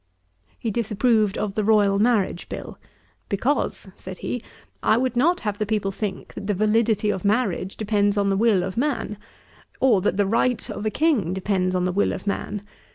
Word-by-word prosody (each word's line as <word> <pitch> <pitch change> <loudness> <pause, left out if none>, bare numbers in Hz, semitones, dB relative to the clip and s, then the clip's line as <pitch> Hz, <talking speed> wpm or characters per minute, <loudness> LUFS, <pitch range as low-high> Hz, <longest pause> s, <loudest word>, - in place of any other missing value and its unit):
He 225 - -3
disapproved 215 -1 +1
of 210 -2 -2
the 215 +1 -1
Royal 205 -2 +4
Marriage 210 -6 +1
Bill; - - -7 0.5
'Because 235 +2 -1
(said 185 -1 -9
he) 245 - -4 0.4
I 220 - +3
would 255 0 0
not 340 +9 +3
have 210 -2 -3
the 215 - 0
people 210 -2 0
think 195 -1 -5
that 200 - -7
the 205 - +1
validity 215 +1 +2
of 190 - -4
marriage 200 -3 0
depends 205 -1 +1
on 200 -1 +2
the 195 - +2
will 205 -3 +3
of 190 +2 -5
man, 245 -6 -1 0.6
or 235 -8 +4
that 200 - 0
the 205 - +3
right 230 +4 +1
of 210 - -3
a - - +3
King 215 - +1
depends 185 -1 0
on 180 0 +1
the 185 - +1
will 200 - +1
of - - -7
man. 205 0 -3
210 Hz, 190 wpm, -23 LUFS, 195-230 Hz, 0.6 s, Royal